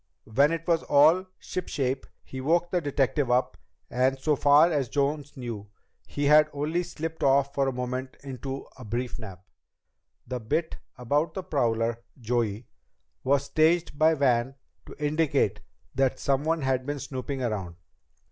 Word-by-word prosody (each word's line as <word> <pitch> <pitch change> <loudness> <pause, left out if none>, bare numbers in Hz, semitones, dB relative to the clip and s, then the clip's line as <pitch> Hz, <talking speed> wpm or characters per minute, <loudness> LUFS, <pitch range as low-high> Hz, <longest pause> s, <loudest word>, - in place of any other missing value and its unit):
"When 140 +8 +3
it 165 0 -3
was 165 -2 +3
all 160 +6 +4
shipshape, 135 -7 -3 0.2
he 130 - -7
woke 170 +5 +1
the 180 - +1
detective 145 -1 0
up, 125 +1 +1 0.3
and 130 +2 +1
so 150 +3 +1
far 145 +5 +5
as 140 -6 0
Jones 145 +1 -1
knew 115 -5 -6 0.4
he 145 - -2
had 150 +1 +6
only 150 +4 -1
slipped 165 -2 -6
off 140 0 +3
for 140 -1 +1
a - - +1
moment 125 +1 -4
into 135 0 -6
a - - -10
brief 120 +3 -3
nap. 95 -5 -10 0.8
The 125 0 -4
bit 160 +9 -2 0.2
about 145 +6 0
the 190 - -4
prowler, 115 -7 0 0.2
Joey, 115 -2 -1 0.6
was 140 +1 +2
staged 160 0 +2
by 160 +1 +5
Van 130 -2 +1 0.3
to - - -10
indicate 150 +1 +1 0.3
that 135 -1 +1
someone 150 +3 0
had 130 -1 +1
been 145 0 -2
snooping 130 0 -4
around. 100 -7 -3
140 Hz, 150 wpm, -27 LUFS, 125-155 Hz, 0.8 s, had